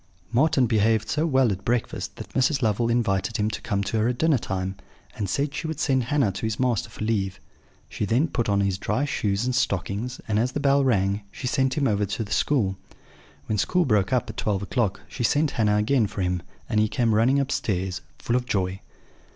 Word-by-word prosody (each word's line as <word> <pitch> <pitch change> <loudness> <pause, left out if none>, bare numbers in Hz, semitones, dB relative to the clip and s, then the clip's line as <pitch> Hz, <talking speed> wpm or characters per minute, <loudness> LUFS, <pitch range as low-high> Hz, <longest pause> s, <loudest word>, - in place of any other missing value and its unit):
Marten 135 0 +4
behaved 110 -1 +2
so 155 +3 +1
well 130 -6 +3
at 95 0 -4
breakfast 120 +3 -2
that - - -10
Mrs. 135 +1 +2
Lovel 115 +2 +1
invited 115 -2 0
him 105 0 0
to - - -5
come 100 -2 -1
to 110 +3 -1
her 110 - +2
at 125 0 -1
dinner 160 -3 +3
time, 95 -1 -3 0.4
and 100 -3 -3
said 140 +7 -1
she 160 - -3
would 160 -2 -4
send 130 -6 +1
Hannah 135 -5 +2
to 95 - -7
his 110 0 -3
master 125 -2 0
for 110 - -7
leave. 100 -4 -1 0.5
She - - -3
then 120 +10 +2
put 120 -7 -1
on 100 0 +2
his 95 -1 0
dry 110 +9 0
shoes 105 -5 -1
and 130 - 0
stockings; 120 0 -1
and 105 -1 +1
as 125 +3 0
the - - -1
bell 140 -1 +3
rang, 100 -5 +1
she - - -8
sent 130 +1 +1
him 140 -2 +2
over 105 -1 +1
to 105 +1 -4
school. 105 -10 +1 0.7
When 105 -2 -1
school 180 - +2
broke 105 -5 +2
up 125 -2 +1
at 110 - -8
twelve 100 -2 -1
o'clock, 100 -2 -1
she 125 - -7
sent 145 +5 +2
Hannah 105 -2 +2
again 110 +1 +2
for 95 - -5
him; 90 -1 0 0.3
and 105 - +1
he 110 - +3
came 115 -1 +1
running 120 +6 +4
upstairs, 95 - -1 0.2
full 120 - -1
of 125 0 0
joy. 95 -3 -1
115 Hz, 215 wpm, -25 LUFS, 100-130 Hz, 0.7 s, Marten